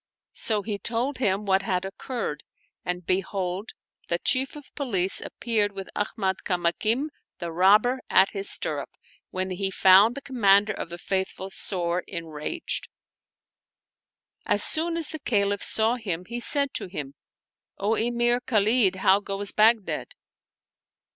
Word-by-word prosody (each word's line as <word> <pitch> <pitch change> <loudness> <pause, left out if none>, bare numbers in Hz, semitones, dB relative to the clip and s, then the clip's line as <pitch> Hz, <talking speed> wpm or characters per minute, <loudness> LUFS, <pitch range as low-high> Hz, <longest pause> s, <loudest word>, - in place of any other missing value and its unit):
'* - - -68 0.2
So 215 -3 +1
he 205 -1 -4
told 240 +6 -1
him 205 -3 0
what 190 -1 +2
had 185 -1 -2
occurred; 195 - -5 0.4
and 180 -1 -3
behold, 190 +1 -2 0.3
the 170 - 0
Chief 260 +9 +1
of 295 -2 -13
Police 195 -10 +2
appeared 215 -4 -1
with 195 -1 -7
Ahmad 195 -2 -1
Kamakim 215 - 0 0.3
the 170 -1 -5
robber 210 +9 +4
at 190 +1 +4
his 200 0 -3
stirrup, - - -3 0.4
when 185 0 -3
he 190 +1 -2
found 195 +5 +5
the 280 - -6
Commander 210 -5 +3
of 175 - -6
the 175 - -7
Faithful 190 +1 -3
sore 175 -2 -2
enraged. 165 - -4 1.6
As - - +5
soon 330 +1 +3
as 325 -3 +4
the 315 - -6
Caliph 200 -6 0
saw 225 +3 +2
him 180 -7 -4
he 240 +3 -5
said 280 +2 +4
to - - -3
him, 145 -7 -6 0.3
" - - -67
O 205 +3 0
Emir 240 +2 +1
Khalid, 215 -3 +2
how 190 +1 +3
goes 200 0 -4
Baghdad?" 220 -1 +2
200 Hz, 145 wpm, -25 LUFS, 185-235 Hz, 1.6 s, found